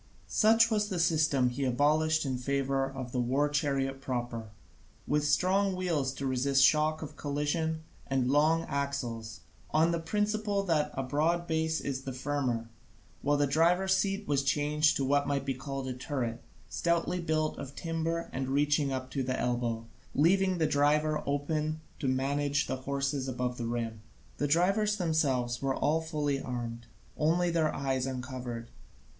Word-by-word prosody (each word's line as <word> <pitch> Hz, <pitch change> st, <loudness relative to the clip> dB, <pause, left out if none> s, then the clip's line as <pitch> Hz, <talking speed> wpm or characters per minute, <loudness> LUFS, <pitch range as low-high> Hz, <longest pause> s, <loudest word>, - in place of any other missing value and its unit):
Such 225 Hz, +1 st, +4 dB
was 210 Hz, -1 st, +1 dB
the 185 Hz, -, -2 dB
system 155 Hz, -6 st, +3 dB
he 130 Hz, +3 st, -3 dB
abolished 150 Hz, +5 st, +2 dB
in 130 Hz, -2 st, -2 dB
favour 135 Hz, +1 st, 0 dB
of 130 Hz, -2 st, -6 dB
the 125 Hz, -, -1 dB
war 130 Hz, +4 st, +2 dB
chariot 135 Hz, -2 st, -1 dB
proper, 120 Hz, -4 st, -3 dB, 0.6 s
with 150 Hz, 0 st, +1 dB
strong 190 Hz, +6 st, +2 dB
wheels 165 Hz, -8 st, 0 dB
to 135 Hz, -, -4 dB
resist 135 Hz, +1 st, +2 dB
the -, -, +9 dB
shock 155 Hz, 0 st, +2 dB
of 150 Hz, -, -8 dB
collision, 160 Hz, +2 st, -1 dB, 0.2 s
and 130 Hz, -2 st, +1 dB
long 155 Hz, +3 st, +3 dB
axles, 140 Hz, -6 st, -3 dB, 0.3 s
on 160 Hz, +2 st, +3 dB
the 170 Hz, -, 0 dB
principle 210 Hz, +3 st, 0 dB
that 160 Hz, -5 st, +1 dB
a 135 Hz, -, -1 dB
broad 160 Hz, +6 st, +1 dB
base 160 Hz, -1 st, 0 dB
is 135 Hz, -1 st, -3 dB
the 135 Hz, -1 st, -5 dB
firmer, 130 Hz, -4 st, -2 dB, 0.5 s
while 145 Hz, +1 st, +2 dB
the 145 Hz, -, +3 dB
driver's 175 Hz, +6 st, +3 dB
seat 195 Hz, +1 st, -1 dB
was 140 Hz, -1 st, +2 dB
changed 150 Hz, +2 st, +2 dB
into 135 Hz, -, 0 dB
what 140 Hz, +1 st, +2 dB
might 140 Hz, -1 st, -1 dB
be 135 Hz, -, 0 dB
called 135 Hz, 0 st, -5 dB
a 130 Hz, -, -2 dB
turret, 125 Hz, -3 st, -3 dB, 0.3 s
stoutly 170 Hz, +1 st, 0 dB
built 155 Hz, -2 st, 0 dB
of 140 Hz, 0 st, -7 dB
timber 165 Hz, 0 st, -2 dB
and 130 Hz, 0 st, -2 dB
reaching 145 Hz, +1 st, +2 dB
up 130 Hz, 0 st, -4 dB
to 135 Hz, -, -1 dB
the 130 Hz, 0 st, -2 dB
elbow, 120 Hz, -2 st, -1 dB, 0.3 s
leaving 185 Hz, +4 st, +3 dB
the 160 Hz, -, +2 dB
driver 150 Hz, +1 st, +2 dB
room 150 Hz, +2 st, -1 dB, 0.2 s
to 140 Hz, -, -2 dB
manage 140 Hz, +2 st, +1 dB
the -, -, -3 dB
horses 140 Hz, +1 st, -2 dB
above 125 Hz, -1 st, -2 dB
the 115 Hz, -, -2 dB
rim. 115 Hz, -2 st, -3 dB, 0.4 s
The 145 Hz, -, 0 dB
drivers 195 Hz, +7 st, +2 dB
themselves 135 Hz, -9 st, 0 dB
were 135 Hz, -1 st, 0 dB
all 155 Hz, +2 st, +1 dB
fully 150 Hz, -4 st, -1 dB
armed, 120 Hz, -2 st, -5 dB, 0.3 s
only 170 Hz, +3 st, +2 dB
their 160 Hz, -2 st, +2 dB
eyes 135 Hz, -2 st, -1 dB
uncovered. 125 Hz, -2 st, -5 dB
145 Hz, 165 wpm, -30 LUFS, 130-160 Hz, 0.6 s, the